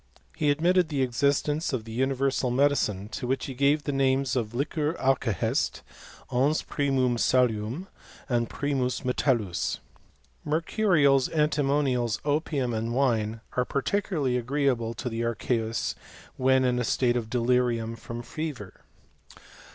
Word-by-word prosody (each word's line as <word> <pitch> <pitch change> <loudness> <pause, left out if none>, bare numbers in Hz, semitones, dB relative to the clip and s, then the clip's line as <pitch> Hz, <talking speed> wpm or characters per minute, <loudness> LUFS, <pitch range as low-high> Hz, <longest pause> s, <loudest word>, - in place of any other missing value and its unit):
He 150 - +1
admitted 175 +4 +3
the 140 -3 0
existence 140 +5 0
of 120 -4 -1
the 115 - -9
universal 135 +1 0
medicine, 120 -7 +1
to 125 - -5
which 130 +1 -1
he 135 - -5
gave 140 +3 +2
the 145 - -2
names 135 -1 +1
of 115 -2 -2
liquor 150 +4 -1
alkahest, 130 - 0 0.5
ens 140 +5 +2
primwin 135 -4 0
salium, 125 - +1 0.6
primus 135 -3 -1
metallus. 125 -7 0 0.7
Mercurials, 155 - +2
antimonials, 140 -6 +1
opium, 145 -4 0
and 115 +1 -2
wine, 115 -5 +1
are 125 - +2
particularly 140 -2 -1
agreeable 125 -2 0
to 125 - -5
the 115 -1 -2
archeusy 115 0 -1 0.4
when 130 0 +3
in 125 -1 +1
a - - 0
state 120 +1 +1
of 115 -3 -2
delirium 120 -1 +1
from 115 +1 -7
fever. 135 - -6
130 Hz, 125 wpm, -27 LUFS, 120-145 Hz, 0.7 s, admitted